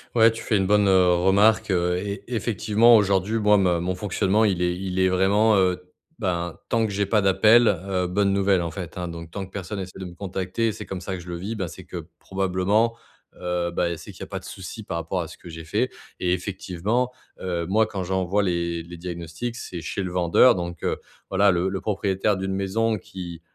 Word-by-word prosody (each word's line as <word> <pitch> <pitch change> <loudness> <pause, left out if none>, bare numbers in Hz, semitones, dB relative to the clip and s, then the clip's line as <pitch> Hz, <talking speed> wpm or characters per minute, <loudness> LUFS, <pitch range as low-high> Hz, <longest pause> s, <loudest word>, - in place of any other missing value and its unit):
Ouais, 115 -1 +6
tu 115 - -7
fais 110 - +2
une 95 -1 +1
bonne, 105 0 +4
heu, 90 -2 +5
remarque, 100 +5 +3
heu, 90 -1 +1
et 100 +1 -4
effectivement, 115 0 +3
aujourd'hui, 100 +1 +1
moi 105 -1 +5
me 90 -3 +2
mon 90 +2 -2
fonctionnement, 100 +2 +1
il 95 -4 +1
est 90 0 +1
il 95 0 -3
est 95 - +4
vraiment, 100 +4 +3
heu, 90 -1 +2 0.4
bah 85 -5 -2
tant 115 -1 +2
que 105 - -3
j'ai 100 +1 0
pas 105 +1 +2
d'appel, 105 +5 +5
heu, 95 -2 0
bonne 100 +2 +1
nouvelle 100 -2 +3
en 85 -1 -3
fait 90 0 -7
hein, 90 -1 -3
donc, 85 -1 -8
tant 100 +1 -4
que 95 - -18
personne 100 +1 -5
essaie 95 -1 -7
de 95 - -5
me 90 - -8
contacter, 95 +4 -2
c'est - - -8
comme 95 -2 -6
ça 95 +1 -4
que 90 - -7
je 90 - -11
le 85 - -4
vis. 100 +6 -4
Ben, 95 -4 -3
c'est 95 - -10
que 85 -3 -7
probablement, 95 +4 +1 0.5
heu, 90 -1 -1
bah, 85 0 0
c'est - - -10
qu'il - - -15
y - - -3
a - - -7
pas - - -5
de - - -15
souci - - -8
par - - -4
rapport 85 +2 -2
à 85 - -5
ce - - -12
que - - -14
j'ai 80 0 -8
fait, 80 - 0 0.3
et 90 -1 +1
effectivement, 100 +6 -2 0.3
heu, 85 -2 -2
moi, 110 +4 +3
quand 100 -3 -4
j'envoie 95 +2 0
les 85 -2 -1
les 85 +1 -10
diagnostics. 85 +6 -5
C'est 90 -6 -6
chez 90 +5 -3
le 90 - -4
vendeur 90 +7 +5
donc 85 -2 -5
heu, - - 0 0.3
voilà, 100 +1 +4
le 90 +1 +1
le 95 0 -4
propriétaire 100 0 0
d'une 95 0 -2
maison 105 +4 0
qui, 90 -3 -8
95 Hz, 230 wpm, -24 LUFS, 90-105 Hz, 0.5 s, Ouais